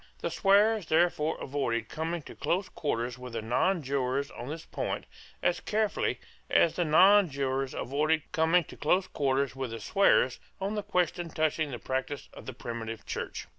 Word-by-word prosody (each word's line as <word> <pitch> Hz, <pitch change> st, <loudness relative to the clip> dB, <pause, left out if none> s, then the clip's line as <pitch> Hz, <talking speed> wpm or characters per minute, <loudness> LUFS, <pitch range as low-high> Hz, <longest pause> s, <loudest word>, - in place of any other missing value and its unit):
The -, -, -3 dB
swearers 205 Hz, -1 st, +3 dB
therefore 160 Hz, -1 st, +2 dB
avoided 120 Hz, -5 st, -2 dB
coming 165 Hz, +3 st, -3 dB
to -, -, -10 dB
close 175 Hz, +7 st, -1 dB
quarters 125 Hz, -4 st, -2 dB
with 125 Hz, -1 st, -8 dB
the 115 Hz, -, -2 dB
nonjurors 140 Hz, -, 0 dB
on 120 Hz, -, -8 dB
this 160 Hz, +2 st, -6 dB
point -, -, -3 dB, 0.4 s
as -, -, +2 dB
carefully 215 Hz, 0 st, 0 dB, 0.3 s
as 165 Hz, -, +4 dB
the 175 Hz, -, +1 dB
nonjurors 150 Hz, -7 st, +4 dB
avoided 150 Hz, +4 st, 0 dB
coming 165 Hz, +1 st, +3 dB
to -, -, -12 dB
close 180 Hz, +5 st, +2 dB
quarters 135 Hz, -2 st, 0 dB
with 135 Hz, -2 st, -3 dB
the 115 Hz, 0 st, -6 dB
swearers 130 Hz, -, +3 dB, 0.2 s
on 195 Hz, +2 st, -2 dB
the 210 Hz, -, -1 dB
question 180 Hz, -3 st, -1 dB
touching 155 Hz, -1 st, 0 dB
the 125 Hz, -, -5 dB
practice 130 Hz, +3 st, -4 dB
of -, -, -12 dB
the 130 Hz, -, -5 dB
primitive 115 Hz, -1 st, -6 dB
Church. -, -, -5 dB
150 Hz, 165 wpm, -29 LUFS, 130-175 Hz, 0.4 s, as